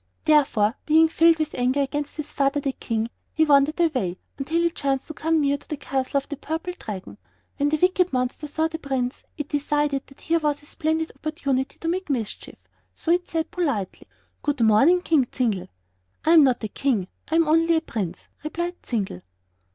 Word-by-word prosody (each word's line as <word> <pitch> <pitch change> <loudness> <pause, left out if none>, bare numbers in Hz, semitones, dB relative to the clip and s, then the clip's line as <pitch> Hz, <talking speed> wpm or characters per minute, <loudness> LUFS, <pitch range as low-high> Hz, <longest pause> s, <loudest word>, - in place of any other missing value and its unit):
Therefore, 270 -9 +4
being 320 +1 +6
filled 330 0 +5
with 310 -1 -2
anger 255 +3 +1
against 290 +2 -3
his 305 -1 -5
father, 275 +1 +1
the 275 -1 -1
King, 230 -2 -3 0.2
he 315 - +4
wandered 290 +2 +4
away 255 - +1 0.2
until 315 +5 0
he 340 - +2
chanced 275 -4 -1
to - - -5
come 320 +1 +1
near 285 -1 +1
to - - -19
the 300 - -3
castle 270 0 -1
of 275 - -2
the 290 - -5
Purple 325 +5 -4
Dragon. 200 -4 -7 0.4
When 285 0 +2
the 310 - +1
wicked 365 +2 +3
monster 255 +3 -2
saw 315 +2 0
the 320 0 -6
Prince, 265 -4 -2 0.2
it 295 -2 -4
decided 290 -1 0
that 275 - -18
here 335 0 +1
was 295 -2 -1
a - - -16
splendid 320 +1 -1
opportunity 280 -4 -2
to 330 - -5
make 365 +1 -1
mischief; 235 -7 -4 0.3
so 330 - -1
it 355 +1 +2
said, 325 -1 -2
politely: 280 - -2 0.3
"Good 290 -4 -1
morning, 250 +12 +5
King 290 -7 +3
Zingle." 220 -8 -1 0.6
"I 320 - +4
am 325 -3 +8
not 255 -4 +2
a - - 0
king 225 -6 0 0.2
I 320 - 0
am 330 -1 +4
only 330 +2 +4
a 320 - +2
prince," 195 - -5 0.2
replied 345 +3 -4
Zingle. 200 - -3
290 Hz, 195 wpm, -24 LUFS, 260-320 Hz, 0.6 s, am